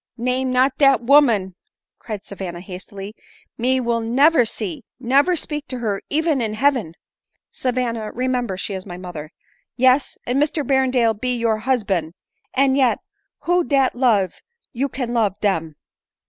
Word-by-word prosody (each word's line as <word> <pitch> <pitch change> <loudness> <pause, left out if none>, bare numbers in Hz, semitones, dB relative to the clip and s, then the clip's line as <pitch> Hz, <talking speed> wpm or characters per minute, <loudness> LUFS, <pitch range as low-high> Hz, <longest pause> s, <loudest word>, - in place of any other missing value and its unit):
" - - -57
Name 255 +2 -1
not 255 +2 +3
dat 275 -4 +5
woman," 235 -8 +4 0.5
cried 215 -3 -6
Savanna 185 -3 -6
hastily; 195 +2 -8 0.4
"me 255 +2 +1
will 235 -2 0
never 250 +5 +4
see, 210 -6 -4 0.2
never 275 +8 +3
speak 300 -2 -3
to 255 - -5
her 210 -5 -2
even 310 -2 +1
in 215 -2 -1
heaven." 245 - +1 0.3
" - - -54
Savanna, 235 -4 -1
remember, 250 -5 -1
she 195 - -4
is 190 -1 -5
my 180 -2 -8
mother." 170 -4 -8 0.3
" - - -46
Yes, 255 +2 +2
and 255 +3 +1
Mr 300 -1 0
Berrendale 255 -3 +2
be 250 +4 -2
your 230 -2 0
husban; 200 -9 -1 0.4
and 265 0 +3
yet, 255 -5 +3 0.4
who 350 +4 +2
dat 275 -4 +2
love 220 -8 +2 0.4
you 270 +3 -1
can 245 -2 -4
love 215 -5 +1
dem 165 -7 -1
240 Hz, 160 wpm, -21 LUFS, 205-265 Hz, 0.5 s, dat